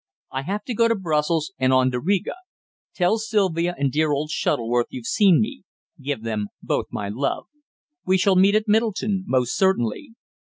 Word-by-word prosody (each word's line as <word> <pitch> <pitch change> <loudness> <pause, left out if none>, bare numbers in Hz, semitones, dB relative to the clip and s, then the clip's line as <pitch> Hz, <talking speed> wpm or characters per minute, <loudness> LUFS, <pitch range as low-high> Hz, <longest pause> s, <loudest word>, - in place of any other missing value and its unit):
"I 135 - -3
have 200 +8 -4
to 245 - -4
go 230 +1 +3
to 230 - +2
Brussels, 160 -2 -1
and 130 0 +2
on 130 0 +3
to 125 - -2
Riga. 190 +7 0 0.6
Tell 185 +5 +2
Sylvia 185 -6 0
and 140 -1 0
dear 155 +1 +1
old 150 +2 -1
Shuttleworth 120 -2 0
you've 125 -3 -8
seen 195 - +4
me. 245 +5 -2 0.4
Give 135 -4 -3
them 110 -2 -2 0.2
both - - -1
my 100 - -4
love. 135 +7 -2 0.6
We 190 +1 +2
shall 190 +1 +3
meet 195 +2 +5
down 215 - +4
at 215 - -21
Middleton, 210 -3 +1
most 125 -2 +1
certainly." 190 - 0
170 Hz, 185 wpm, -23 LUFS, 130-200 Hz, 0.6 s, meet